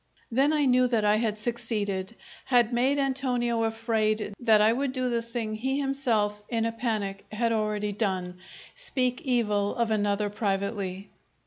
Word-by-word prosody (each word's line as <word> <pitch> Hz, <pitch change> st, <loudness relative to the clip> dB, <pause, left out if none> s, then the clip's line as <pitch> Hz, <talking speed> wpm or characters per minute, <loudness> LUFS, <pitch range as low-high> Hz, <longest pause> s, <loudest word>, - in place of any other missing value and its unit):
Then 270 Hz, +5 st, +3 dB
I 300 Hz, -2 st, +2 dB
knew 255 Hz, -1 st, +4 dB
that 230 Hz, -4 st, +1 dB
I 210 Hz, +1 st, +4 dB
had 215 Hz, -1 st, -1 dB
succeeded, 210 Hz, -3 st, -2 dB, 0.3 s
had 240 Hz, -2 st, +3 dB
made 260 Hz, +4 st, +2 dB
Antonio 255 Hz, -4 st, 0 dB
afraid 220 Hz, -2 st, 0 dB
that 225 Hz, -3 st, +5 dB
I 215 Hz, +2 st, +5 dB
would 265 Hz, +1 st, -1 dB
do 255 Hz, -1 st, -1 dB
the 235 Hz, -1 st, +1 dB
thing 230 Hz, -2 st, -4 dB
he 265 Hz, +6 st, -1 dB
himself, 235 Hz, -7 st, 0 dB
in 230 Hz, -2 st, 0 dB
a 230 Hz, -, 0 dB
panic, 215 Hz, -4 st, -3 dB
had 230 Hz, +2 st, 0 dB
already 210 Hz, -1 st, 0 dB
done 185 Hz, -4 st, -2 dB, 0.3 s
speak 255 Hz, -, -1 dB
evil 210 Hz, -6 st, 0 dB
of 235 Hz, -3 st, 0 dB
another 205 Hz, -1 st, 0 dB
privately. 200 Hz, -2 st, -2 dB
225 Hz, 155 wpm, -27 LUFS, 210-250 Hz, 0.3 s, that